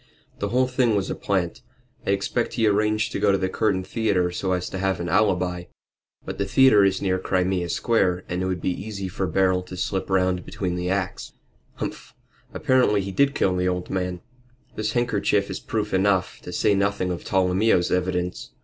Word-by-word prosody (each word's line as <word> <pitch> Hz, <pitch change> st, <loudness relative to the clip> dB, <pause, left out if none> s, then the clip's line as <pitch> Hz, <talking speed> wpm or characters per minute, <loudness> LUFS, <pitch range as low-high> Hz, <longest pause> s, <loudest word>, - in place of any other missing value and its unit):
"The 100 Hz, -, -2 dB
whole 125 Hz, +3 st, +3 dB
thing 125 Hz, -3 st, +1 dB
was 100 Hz, -2 st, -1 dB
a -, -, -2 dB
plant. 95 Hz, -4 st, -2 dB, 0.5 s
I -, -, 0 dB
expect 100 Hz, +4 st, 0 dB
he 115 Hz, -, +1 dB
arranged 105 Hz, +1 st, +1 dB
to -, -, -3 dB
go 100 Hz, 0 st, +3 dB
to 100 Hz, -, +3 dB
the 95 Hz, 0 st, -1 dB
Curtain 95 Hz, -2 st, 0 dB
Theatre 95 Hz, -3 st, 0 dB
so 95 Hz, +1 st, -2 dB
as 90 Hz, -1 st, -2 dB
to 95 Hz, -, -4 dB
have 95 Hz, -2 st, 0 dB
an 85 Hz, -, -3 dB
alibi. 90 Hz, -2 st, +1 dB, 0.6 s
But -, -, -6 dB
the 100 Hz, -, +1 dB
theatre 110 Hz, -1 st, +6 dB
is 95 Hz, 0 st, +1 dB
near 95 Hz, -1 st, +1 dB
Crimea 90 Hz, -1 st, 0 dB
Square 95 Hz, -4 st, +1 dB
and 90 Hz, +1 st, -2 dB
it 95 Hz, -, -1 dB
would 90 Hz, -2 st, -2 dB
be -, -, 0 dB
easy 100 Hz, +1 st, -5 dB
for 95 Hz, +1 st, -2 dB
Beryl 95 Hz, +2 st, +2 dB
to 90 Hz, 0 st, -9 dB
slip 95 Hz, +2 st, -2 dB
round 95 Hz, -1 st, +1 dB
between 90 Hz, -3 st, -3 dB
the 90 Hz, 0 st, -2 dB
acts. 95 Hz, -1 st, -3 dB, 0.4 s
Humph! -, -, -6 dB, 0.4 s
Evidently 125 Hz, -6 st, +2 dB
he 95 Hz, 0 st, -5 dB
did 140 Hz, +7 st, +2 dB
kill 95 Hz, -1 st, +2 dB
the 90 Hz, 0 st, 0 dB
old 90 Hz, -1 st, -2 dB
man 90 Hz, -2 st, -2 dB, 0.5 s
this 110 Hz, 0 st, -2 dB
handkerchief 105 Hz, -4 st, +1 dB
is 95 Hz, -, -4 dB
proof 105 Hz, -2 st, -3 dB
enough, 95 Hz, -1 st, +1 dB
to -, -, -8 dB
say 105 Hz, +3 st, +2 dB
nothing 100 Hz, -2 st, 0 dB
of 90 Hz, -, -5 dB
Tolomeo's 95 Hz, 0 st, +2 dB
evidence. 90 Hz, 0 st, -1 dB
95 Hz, 195 wpm, -24 LUFS, 90-105 Hz, 0.6 s, theatre